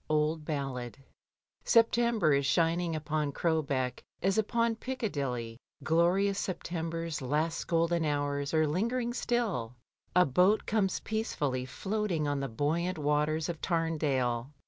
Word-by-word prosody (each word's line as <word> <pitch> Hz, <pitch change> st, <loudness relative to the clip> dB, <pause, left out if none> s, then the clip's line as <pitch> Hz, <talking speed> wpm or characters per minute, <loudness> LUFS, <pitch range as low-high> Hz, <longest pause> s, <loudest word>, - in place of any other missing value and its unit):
Old 155 Hz, +1 st, +1 dB
Ballad. 135 Hz, -5 st, -4 dB, 0.7 s
September 230 Hz, -7 st, +3 dB
is 140 Hz, -1 st, +2 dB
shining 165 Hz, +3 st, +1 dB
upon 150 Hz, -1 st, -1 dB
Crowbeck 140 Hz, -5 st, -1 dB, 0.2 s
as 195 Hz, +3 st, +2 dB
upon 230 Hz, +1 st, +1 dB
Piccadilly, 140 Hz, -, -3 dB, 0.2 s
glorious 185 Hz, +5 st, +2 dB
September's 165 Hz, -3 st, -3 dB
last 150 Hz, +5 st, -1 dB
golden 170 Hz, 0 st, +2 dB
hours 145 Hz, -1 st, -1 dB
are 155 Hz, -1 st, +3 dB
lingering 235 Hz, +10 st, -1 dB
still; 215 Hz, -, -1 dB, 0.4 s
a 180 Hz, 0 st, +6 dB
boat 180 Hz, +10 st, +3 dB
comes 200 Hz, -4 st, 0 dB
peacefully 145 Hz, -, -2 dB
floating 190 Hz, -1 st, -2 dB
on 145 Hz, -1 st, 0 dB
the 135 Hz, -, -3 dB
buoyant 160 Hz, +9 st, -1 dB
waters 150 Hz, +1 st, +1 dB
of 170 Hz, -3 st, -5 dB
Tamdale. 140 Hz, -8 st, 0 dB
160 Hz, 120 wpm, -30 LUFS, 145-190 Hz, 0.7 s, a